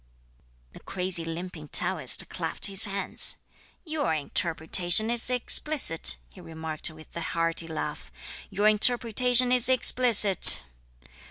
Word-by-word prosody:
The -, -, -14 dB
crazy 180 Hz, -2 st, -3 dB
limping 165 Hz, -1 st, -10 dB
Taoist -, -, 0 dB
clapped -, -, -6 dB
his 195 Hz, +2 st, +2 dB
hands. 200 Hz, -1 st, -1 dB, 0.5 s
"Your 305 Hz, -, -4 dB
interpretation 175 Hz, +7 st, -2 dB
is 240 Hz, 0 st, +2 dB
explicit," 250 Hz, -, +1 dB, 0.2 s
he -, -, -16 dB
remarked 160 Hz, -1 st, -9 dB
with 155 Hz, 0 st, -19 dB
a 170 Hz, -, -7 dB
hearty 165 Hz, 0 st, -5 dB
laugh, 160 Hz, -1 st, -9 dB, 0.4 s
"your 205 Hz, +2 st, -2 dB
interpretation 245 Hz, +3 st, 0 dB
is 250 Hz, 0 st, +2 dB
explicit!" 235 Hz, -, +6 dB
190 Hz, 110 wpm, -23 LUFS, 165-240 Hz, 0.5 s, explicit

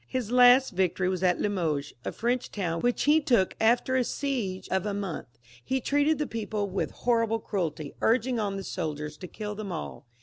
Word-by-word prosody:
His 250 Hz, -4 st, -3 dB
last 250 Hz, +1 st, +6 dB
victory 185 Hz, 0 st, 0 dB
was 185 Hz, -1 st, -2 dB
at 180 Hz, -1 st, +2 dB
Limoges, 160 Hz, -8 st, -1 dB
a -, -, -3 dB
French 245 Hz, +2 st, -1 dB
town, 170 Hz, -5 st, -2 dB
which 245 Hz, 0 st, +1 dB
he 295 Hz, +2 st, +5 dB
had 295 Hz, -, -12 dB
taken 225 Hz, -8 st, +3 dB
after 240 Hz, +3 st, +3 dB
a 255 Hz, -, +3 dB
siege 235 Hz, -9 st, -3 dB
of 190 Hz, +2 st, 0 dB
a 205 Hz, -, -2 dB
month, 195 Hz, -5 st, -4 dB
where 120 Hz, 0 st, -24 dB
he 265 Hz, -, 0 dB
treated 290 Hz, +4 st, +2 dB
the 300 Hz, -, -1 dB
people 215 Hz, -4 st, -3 dB
with 190 Hz, 0 st, -2 dB
horrible 230 Hz, -2 st, +1 dB
cruelty, 165 Hz, -9 st, -3 dB
urging 240 Hz, +1 st, +2 dB
on 200 Hz, -2 st, -1 dB
the 195 Hz, -, -5 dB
soldiers 150 Hz, -3 st, -4 dB
to 180 Hz, -, -8 dB
kill 210 Hz, +3 st, -6 dB
them 205 Hz, -2 st, -6 dB
all. 160 Hz, -6 st, -6 dB
210 Hz, 205 wpm, -28 LUFS, 185-245 Hz, -, last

